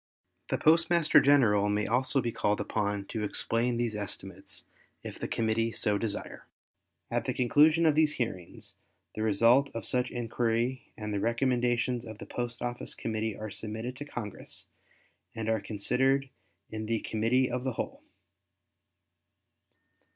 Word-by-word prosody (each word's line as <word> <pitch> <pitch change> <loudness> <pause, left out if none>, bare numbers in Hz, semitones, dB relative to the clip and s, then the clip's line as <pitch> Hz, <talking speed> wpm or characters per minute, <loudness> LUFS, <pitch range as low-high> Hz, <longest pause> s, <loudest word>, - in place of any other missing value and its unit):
The - - +1
Postmaster 165 0 +5
General 110 -8 +4
may 105 0 +1
also 130 +3 +3
be 120 - -1
called 105 -1 0
upon 105 -2 -1
to 110 +1 -4
explain 115 +3 0
these 120 -2 -1
estimates 100 -2 -4 0.4
if - - -8
the - - -3
Committee 115 0 0
so 105 -2 +1
desire. 110 -3 -4 0.6
At - - 0
the - - -2
conclusion 150 +6 +4
of 155 - +5
these 155 0 +3
hearings, 95 -8 -5 0.4
the 110 - -5
result 115 +6 +4
of 115 - -4
such 125 0 +1
inquiry 120 +1 -1
and 105 -1 -4
the 100 - 0
recommendations 120 +1 +1
of 110 -3 -9
the - - -9
Post 120 -1 -4
Office 120 0 -3
Committee 110 -1 -3
are 110 -1 -6
submitted 110 +5 -5
to 145 - -6
Congress 115 -8 -6 0.7
and 110 -1 -4
are 110 -2 +1
considered 130 +6 +1 0.4
in 110 0 -4 0.2
Committee 115 +4 +1
of 125 0 -2
the 130 -1 -1
Whole. - - -5
115 Hz, 145 wpm, -29 LUFS, 110-130 Hz, 0.7 s, Postmaster